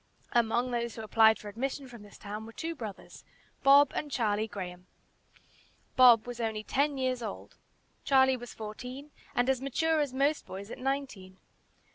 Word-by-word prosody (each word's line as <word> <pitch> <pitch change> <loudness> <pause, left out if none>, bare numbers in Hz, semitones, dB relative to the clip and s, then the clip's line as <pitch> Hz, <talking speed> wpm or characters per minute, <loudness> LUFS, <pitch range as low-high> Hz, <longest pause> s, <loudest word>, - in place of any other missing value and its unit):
Among 240 +1 +1
those 235 -1 -2
who 225 - -7
applied 220 0 +5
for 210 - -11
admission 265 +6 -4
from 240 -3 -12
this 205 -1 -14
town 210 +2 -7
were - - -10
two 330 +6 -4
brothers, 220 - -9 0.4
Bob 280 +1 +6
and 295 - -4
Charlie 220 -3 0
Graham. 180 -3 -8 1.1
Bob 245 -3 +7
was 245 -1 -7
only 220 -2 -2
ten 280 +4 0
years 255 -1 -1
old. 215 -3 -7 0.5
Charlie 265 -2 +4
was 245 -1 -9
fourteen, 250 +7 -8 0.2
and 245 +1 +2
as 265 -1 +1
mature 315 +4 +1
as 290 -3 0
most 280 +4 0
boys 200 +3 -8
at - - -8
nineteen. 255 -9 -4
245 Hz, 165 wpm, -30 LUFS, 215-270 Hz, 1.1 s, Bob